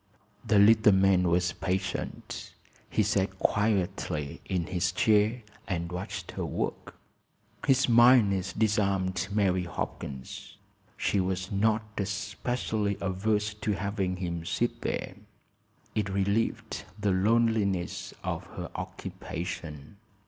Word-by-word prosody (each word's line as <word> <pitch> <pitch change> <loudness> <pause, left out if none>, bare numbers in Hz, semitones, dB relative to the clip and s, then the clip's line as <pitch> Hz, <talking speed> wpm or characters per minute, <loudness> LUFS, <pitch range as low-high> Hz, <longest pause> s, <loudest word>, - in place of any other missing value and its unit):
The 110 - +3
little 105 0 +7
man 95 -1 +4
was 90 +1 +2
patient. 95 +2 -4 0.3
He 110 - +2
sat 95 -1 0
quietly 95 -9 0
in 90 -3 -1
his 90 0 0
chair 110 +5 +3 0.2
and 85 -2 -2
watched 90 +2 -5
her - - -4
work. - - -3 0.7
His 135 -1 +4
mildness 115 -6 +5
disarmed 100 -4 +1
Mary 95 -3 +2
Hopkins. 65 -5 -6 0.4
She 100 - +1
was 95 0 -1
not 110 +2 +2 0.2
especially 100 +1 -2
averse 105 +2 0
to 105 0 -2
having 100 -2 -1
him 85 -2 -3
sit - - -1
there. - - -3 0.8
It 105 -2 0
relieved 100 +1 -1 0.2
the 105 -1 +1
loneliness 100 -2 +1
of - - -3
her - - -5
occupation. 80 +1 -6
100 Hz, 110 wpm, -29 LUFS, 90-105 Hz, 0.8 s, little